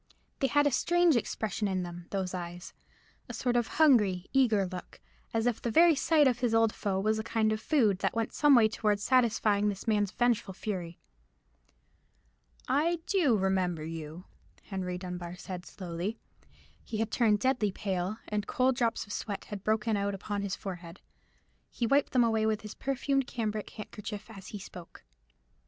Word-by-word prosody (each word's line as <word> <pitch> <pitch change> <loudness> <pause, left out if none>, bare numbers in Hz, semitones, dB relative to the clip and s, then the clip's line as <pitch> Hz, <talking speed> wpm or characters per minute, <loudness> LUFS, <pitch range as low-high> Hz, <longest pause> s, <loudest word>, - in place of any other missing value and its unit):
They 270 - +2
had 290 +3 +3
a 290 - +3
strange 345 +4 +3
expression 220 -2 -1
in 185 -2 -1
them, 175 0 -8
those 190 -2 -2
eyes—a 175 0 -10
sort 245 -1 0
of 240 -2 +2
hungry, 210 - +4
eager 230 -7 +3
look, 180 -1 -8 0.3
as 225 0 0
if 240 -2 0
the 235 - -1
very 330 +8 +6
sight 300 0 +4
of 245 -2 +1
his 240 -3 +1
old 225 -1 +3
foe 195 -2 -1
was 215 +2 +1
a - - -3
kind 220 -1 +1
of 215 - -4
food 220 - +2
that - - -1
went 225 -1 -1
some 295 -2 +5
way 230 -3 +6
towards 210 -2 0
satisfying 215 -4 +3
this 195 +1 -6
man's 205 -2 +2
vengeful 230 -4 0
fury. 180 -5 -4 1.7
"I 330 +4 +1
do 315 - +3
remember 185 -4 0
you," 160 +2 -7 0.4
Henry 185 -2 -4
Dunbar 180 -1 -6
said 180 0 -7
slowly. 180 +4 -5 0.7
He 220 - -5
had 225 0 -1
turned 220 -4 +3
deadly 245 -4 +1
pale, 190 +1 -2
and 210 -1 -2
cold 255 0 +2
drops 230 -2 0
of 205 - -7
sweat 200 -2 -4
had 205 -2 -7
broken 220 0 +1
out 200 0 -1
upon 205 +1 -4
his 200 -1 -2
forehead: 175 -2 -8 0.7
he 240 - -2
wiped 275 +4 +2
them 250 -2 +4
away 220 -1 +2
with 215 0 0
his 215 -1 -8
perfumed 275 0 -1
cambric 215 -3 -3
handkerchief 210 0 -8
as 195 -3 -11
he 210 - -6
spoke. 180 -3 -11
215 Hz, 175 wpm, -30 LUFS, 190-240 Hz, 1.7 s, very